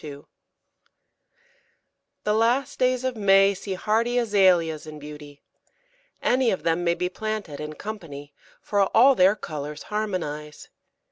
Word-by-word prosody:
] - - -24 2.2
The 210 - +1
last 245 +5 +1
days 255 0 +1
of 260 -1 -2
May 195 -1 +4
see 195 0 -5
hardy 225 +5 0
Azaleas 185 -9 +2
in 155 0 -9
beauty. 150 -1 -11 0.8
Any 255 -1 +2
of 190 - -2
them 165 +1 0
may 170 0 +1
be 180 +1 -1
planted 210 -5 -5
in 150 0 -6
company, 150 -7 -8 0.3
for 205 -1 0 0.2
all 265 +4 +7
their 190 -2 +4
colours 150 -5 -7
harmonise. 160 -8 -4
195 Hz, 130 wpm, -24 LUFS, 155-220 Hz, 2.2 s, all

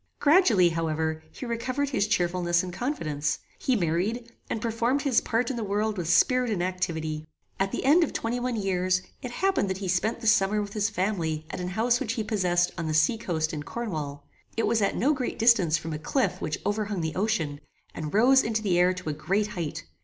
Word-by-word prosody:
Gradually, 275 - +5
however, 160 -1 -1
he - - -8
recovered 255 +4 -2
his 210 -7 +1
cheerfulness 175 -3 +1
and 180 -1 -6
confidence. 155 - -2 0.2
He 260 - +1
married, 205 +7 -1 0.2
and - - -2
performed 235 +5 0
his 270 -5 +3
part 235 +3 0
in 250 - -4
the 230 - -2
world 210 +1 -1
with 175 -4 -3
spirit 250 +7 +4
and 195 -5 0
activity. 160 -4 -3 0.3
At 195 0 +1
the - - -3
end 315 +6 +6
of 325 - -1
twenty 235 +2 -2
one 245 0 -2
years 185 -2 0 0.2
it 250 - -5
happened 345 - 0
that 190 - -2
he 195 -1 -5
spent 190 +6 0
the 230 - -9
summer 210 -1 +3
with 205 -1 -4
his 210 0 +1
family 170 -6 -1
at - - -5
an 180 - -3
house 230 +6 +1
which 230 -4 -2
he 225 -3 -2
possessed 180 -4 +1
on 165 - -2
the 155 - -1
sea 160 +9 +3
coast 160 -6 -2
in 150 - -3
Cornwall. 150 -8 -5 0.3
It 225 - +2
was 225 - +2
at 200 - +1
no 285 +6 +2
great 260 -4 -3
distance 205 -9 +4
from 160 0 -5
a 150 - -4
cliff 260 - -1
which 150 - -2
overhung 205 -2 -1
the 160 -1 -2
ocean, 180 -8 -1 0.3
and 155 -2 -5
rose 255 +6 +5
into 220 -1 -1
the 180 -4 +2
air 180 +1 +4
to 185 -3 -5
a - - -1
great 195 +8 -1
height. 170 -7 -4
200 Hz, 215 wpm, -27 LUFS, 170-230 Hz, 0.3 s, end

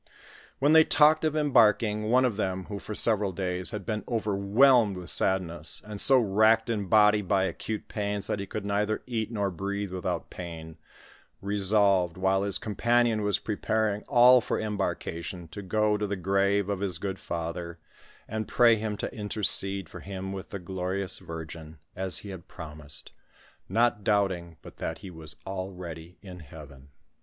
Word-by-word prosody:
When 145 +3 +3
they 160 0 +8
talked 155 +1 +4
of 155 -1 0
embarking, 110 -7 +3
one 130 +2 +4
of 120 -5 0
them, 95 -2 -2
who 100 -2 -6
for 105 - -7
several 105 -4 +1
days 90 0 -2
had 105 -4 -6
been 105 +1 -3
overwhelmed 110 +1 +3
with 90 -1 -1
sadness, 85 -4 +1
and 105 -1 -2
so 135 - +7
racked 110 +1 +3
in 105 -4 -2
body 105 0 +5
by 95 0 +1
acute 105 +2 -4
pains 105 -1 -3
that 105 - -1
he 100 - -5
could 105 +1 -5
neither 105 +1 -1
eat 115 -3 -3
nor 100 -3 -1
breathe 100 +2 -4
without 90 -3 -4
pain, 80 -2 -8 0.6
resolved, 100 -3 +2
while 95 +1 +2
his 100 -1 -1
companion 115 +1 +1
was 105 -1 +1
pre 105 - -4
paring 105 -1 0
all 125 +1 +7
for - - -2
embarkation, 95 -4 -4
to 100 - -8
go 105 +2 +1
to 105 0 -2
the 100 - -2
grave 100 +2 +1
of 100 -2 -2
his 95 -4 -1
good 95 +1 -4
father, 85 0 -5 0.5
and 110 0 -4
pray 115 -2 +5
him 105 -1 -3
to - - -4
intercede 100 -3 -1
for - - -10
him 95 0 -6
with 95 -1 -7
the 100 - -5
glorious 95 +1 -3
Virgin, 80 -1 -8 0.2
as 95 -3 0
he - - -7
had 95 -3 -9
promised, 75 -5 -8 0.6
not 110 +1 +2
doubting 95 -5 0
but - - -13
that 80 - -4
he 95 - -8
was 80 -2 -6
already 90 -3 -7
in 90 -2 -10
heaven. 70 -3 -13
100 Hz, 170 wpm, -27 LUFS, 90-110 Hz, 0.6 s, they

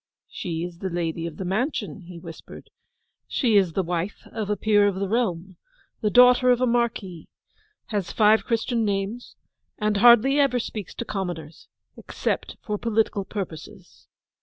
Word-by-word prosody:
'She 165 -2 -4
is 175 -1 -7
the 190 - -3
lady 170 -1 -2
of 160 -2 -9
the 190 - -5
mansion,' 205 - -2
he 180 -1 -9
whispered. 165 -1 -11 0.6
'She 235 -6 +1
is 190 -5 +3
the 190 - 0
wife 175 +3 -3
of 215 -2 -4
a 210 - 0
peer 205 -1 +3
of 200 - 0
the 195 +1 -2
realm, 190 -5 -1 0.4
the 210 - +1
daughter 250 +2 +6
of 245 -1 +4
a 255 - +2
marquis, 230 -8 -1 0.6
has 200 -5 -2
five 215 0 +4
Christian 230 0 0
names; 205 +3 -3 0.4
and 210 -1 0
hardly 240 +5 +6
ever 275 -3 +3
speaks 215 -5 -5
to 235 - -5
commoners, 175 -7 -5 0.3
except - - -3
for 210 -4 -3
political 220 -3 0
purposes. 190 -1 -8
205 Hz, 160 wpm, -24 LUFS, 180-230 Hz, 0.6 s, daughter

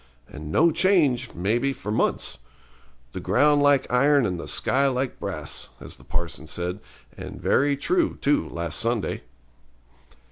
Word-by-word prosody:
And 75 0 -8
no 165 - +4
change, 145 -10 +2
maybe, 115 +10 0
for 105 - -6
months. 85 - 0 0.7
The - - -6
ground 145 0 +3
like 145 -2 +4
iron 140 +1 +4
and 90 -4 -2
the - - -7
sky 140 +1 +2
like 130 -1 -2
brass, - - -5
as - - -10
the - - -18
parson 85 -2 -5
said, 90 +4 -4 0.4
and - - -8
very 140 0 +2
true, 340 - 0
too, 145 +1 +1
last 85 -2 -3
Sunday. 115 -2 -1
130 Hz, 145 wpm, -24 LUFS, 90-145 Hz, 0.7 s, no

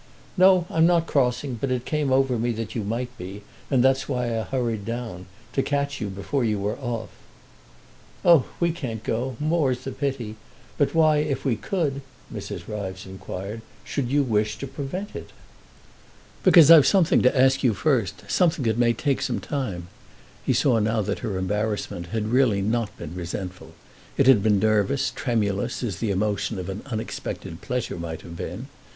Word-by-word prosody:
"No, 185 -1 +5
I'm 160 0 +4
not 170 -2 +3
crossing; 125 -3 0
but 140 - 0
it 125 -1 -1
came 150 -3 0
over 130 -2 +2
me 120 +1 0
that 115 -2 -5
you 115 - -2
might 120 +4 -3
be, 95 +3 -7 0.3
and 130 -3 +3
that's 135 +1 +2
why 125 -3 -1
I 110 - 0
hurried 115 -4 -2
down—to 115 +1 -5
catch 140 -1 -1
you 105 - -2
before 100 +8 -2
you 110 -2 +1
were 100 +2 -2
off." 120 -4 -4 1.2
"Oh, 170 -6 +7
we 170 -1 +2
can't 120 -10 -5
go—more's 130 +2 0
the 135 - -4
pity; 130 -7 -3 0.4
but 145 +2 +1
why, 155 -2 +5
if 150 -2 -1
we 130 -4 +2
could," 145 - -2 0.3
Mrs. - - -6
Ryves 95 -2 -5
inquired, 95 +3 -7 0.2
"should 135 -4 -2
you 145 +2 +3
wish 110 -3 0
to - - -5
prevent 140 +9 -5
it?" - - -7 1.1
"Because 165 -3 +8
I've 160 -4 +9
something 185 -5 +4
to 130 +1 +3
ask 135 +1 +4
you 120 -6 +2
first, 120 - 0
something 165 -7 +2
that 110 0 +1
may 120 -1 +4
take 140 +4 0
some - - -1
time." 105 - -4 0.6
He - - +1
saw 125 -5 +3
now 110 0 +1
that 100 +1 -2
her 100 -4 -3
embarrassment 105 -2 -2
had 110 +4 -2
really 120 -7 +3
not 110 +1 -1
been 85 -1 -7
resentful; 90 +1 -6 0.4
it 140 - +4
had 130 -6 +6
been 105 -1 +3
nervous, 110 +5 +2
tremulous, 115 -1 -1
as 100 -7 -2
the 115 - -1
emotion 100 +2 -1
of 90 -1 -5
an 95 +2 -5
unexpected 110 - -5
pleasure 125 -6 -3
might 80 -1 -5
have 85 - -9
been. 90 +8 -6
120 Hz, 175 wpm, -24 LUFS, 105-135 Hz, 1.2 s, I've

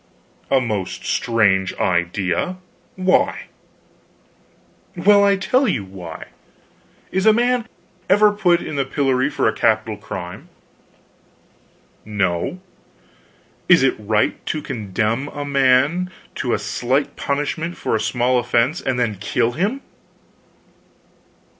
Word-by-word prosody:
"A 135 - +4
most 105 -7 -3
strange 100 -5 +1
idea. 90 - -1 0.4
Why?" 185 0 +1 1.5
"Well, 200 +3 +5
I'll 200 -1 +4
tell 250 +8 +1
you 110 - 0
why. 90 -4 -9 0.8
Is 190 +3 +1
a 220 - +8
man 245 0 +1 0.4
ever 205 +2 +5
put 180 -4 +2
in 150 - -5
the 140 - +2
pillory 135 0 0
for - - 0
a - - +2
capital - - +1
crime?" 100 - -8 1.5
"No." 100 - -1 1.1
"Is 175 -6 +6
it 135 - +3
right 105 0 0
to 155 -1 -2
condemn 110 +1 -2
a 145 0 -6
man 140 +6 +2 0.2
to - - -1
a - - -1
slight 130 +4 -1
punishment 150 +4 -2
for - - -1
a - - +1
small 125 +2 +1
offense 120 +6 +1
and 130 -2 -1
then 110 -4 0
kill 115 +3 0
him?" 205 - -1
135 Hz, 115 wpm, -20 LUFS, 110-180 Hz, 1.5 s, a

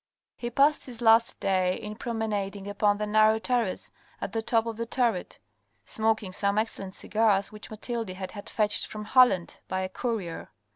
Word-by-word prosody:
He 240 - -4
passed 280 +5 +3
his 240 -3 -7
last 225 -1 +4
day 185 -2 +1
in 210 0 -6
promenading 210 -4 -3
upon 205 0 +2
the 210 - -2
narrow 215 +1 +4
terrace 230 -4 -1 0.3
at - - -4
the 225 +1 -1
top 225 0 +1
of 230 -1 -4
the 230 +1 -4
turret, 230 -7 0 0.5
smoking 220 -3 0
some 200 +1 0
excellent 200 -3 -2
cigars 210 -2 +1
which 210 0 -8
Mathilde 225 0 -4
had 185 0 -6
had 205 -2 -8
fetched 210 -1 +1
from 210 0 -7
Holland 220 -7 +4
by 185 0 -2
a 185 - -3
courier. 200 -6 -4
215 Hz, 175 wpm, -27 LUFS, 195-230 Hz, 0.5 s, last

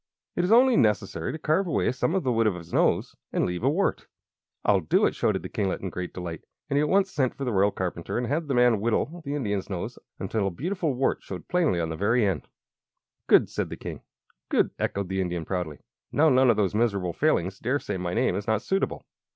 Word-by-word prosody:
It 175 - +1
is 180 - +1
only 250 +2 +6
necessary 100 -6 +1
to - - -5
carve 160 +5 +1
away 165 - +1
some 140 +7 0
of 190 - +1
the 130 - +1
wood 115 -1 +2
of 100 - +1
his 85 -2 -10
nose, - - +2 0.2
and - - +1
leave 90 0 -3
a 130 - +3
wart." 185 +7 0 0.6
"I'll 100 -2 +4
do 80 -4 +2
it!" - - +1
shouted - - 0
the - - -4
kinglet, 95 -2 -2
in 95 - -4
great 90 -1 -5
delight. 85 -3 -6 0.3
And 140 - +2
he - - +4
at 150 - +1
once 195 0 +3
sent 130 -4 0
for 140 - -4
the 125 - 0
Royal 100 +1 +4
Carpenter 90 -2 -4
and 120 - 0
had 150 +5 -1
the 135 - 0
man 120 -3 +4
whittle 135 +9 -1
the 145 0 -3
Indian's 105 -9 -2
nose 90 -3 -5 0.2
until 105 -3 -1
a - - +1
beautiful 160 - -2
wart 130 +2 0
showed 90 -3 -8
plainly 165 - +2
on 80 -1 -1
the 80 - -3
very 110 +6 +2
end. 95 -3 -1 0.8
"Good!" - - +6
said - - -3
the - - -6
King. - - -7 0.5
"Good!" - - +2
echoed 100 -1 -1
the 95 +1 -1
Indian, 90 -3 -3
proudly. 90 -5 -3 0.3
"Now 155 +3 +4
none 130 -1 +5
of 115 - +4
those 100 -3 +1
miserable 100 -6 0
Failings 95 - +1
dare 130 +5 0
say 120 - -4
my 90 +1 -3
name 120 -5 +2
is 100 +2 -4
not 110 -1 +1
suitable!" 195 +1 -1
110 Hz, 235 wpm, -26 LUFS, 95-145 Hz, 0.8 s, only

